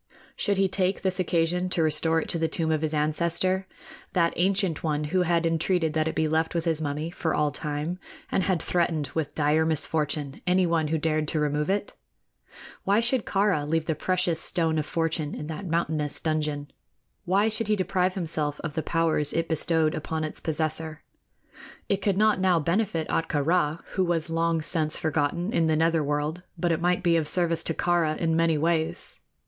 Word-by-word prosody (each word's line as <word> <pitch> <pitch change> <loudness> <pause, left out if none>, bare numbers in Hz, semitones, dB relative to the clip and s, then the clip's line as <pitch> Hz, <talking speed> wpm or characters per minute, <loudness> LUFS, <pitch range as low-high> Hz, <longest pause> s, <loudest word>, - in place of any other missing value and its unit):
Should 200 -3 0
he 195 0 +3
take 190 0 -1
this 190 -1 0
occasion 180 +1 +1
to 170 -2 +1
restore 160 +1 +2
it - - -4
to 170 - 0
the 160 - +1
tomb 160 0 -1
of 155 -1 +1
his 155 -1 -1
ancestor 170 +5 +1 0.5
that 170 -2 +2
ancient 190 -2 +1
one 150 -2 0
who 180 +5 +1
had 170 -1 +1
entreated 165 0 +1
that 155 0 +1
it 160 - -3
be 160 - +1
left 160 +2 0
with 165 0 -1
his 160 -2 0
mummy 150 +2 -3
for 165 -2 -1
all 150 -1 +1
time, 150 +5 -3 0.3
and - - +2
had 185 -2 0
threatened 165 -5 0
with 155 -3 -3
dire 150 +1 +2
misfortune 150 -2 -1
anyone 170 -3 +2
who 160 +1 0
dared 155 0 0
to 155 - -1
remove 150 +1 0
it? 205 +1 -1 0.9
Why 200 +2 +3
should 240 0 +1
Kāra 195 -7 +1
leave 165 0 +1
the 160 - 0
precious 180 +1 0
Stone 160 -2 0
of 150 - -3
Fortune 160 -2 -1
in - - -6
that 160 +5 -6
mountainous 160 -3 -1
dungeon? 150 -2 -2 0.5
Why 195 +4 +3
should 220 0 -1
he 215 - +3
deprive 185 -1 0
himself 155 -5 -1
of 155 - -4
the 160 - -1
powers 160 -3 +1
it 165 0 0
bestowed 160 0 +2
upon 160 +1 -3
its 155 - -4
possessor? 155 0 -2 0.8
It 200 0 0
could 195 -2 +1
not 215 -1 +3
now 185 -2 +3
benefit 170 0 0
Ahtka 150 -3 0
Rā, 165 -1 +1
who 190 - 0
was 170 -2 -1
long 165 -1 +1
since 155 -2 +1
forgotten 160 +6 -1
in 165 -7 +2
the 160 - +2
nether 165 0 +2
world; 150 +4 -2 0.2
but 170 +1 0
it 165 - 0
might 180 +1 +1
be 170 -2 +4
of 155 -2 -1
service 170 -1 +1
to 165 - -1
Kāra 170 -3 +1
in 165 -1 0
many 165 -1 +2
ways. 160 +1 -1
165 Hz, 195 wpm, -26 LUFS, 155-180 Hz, 0.9 s, be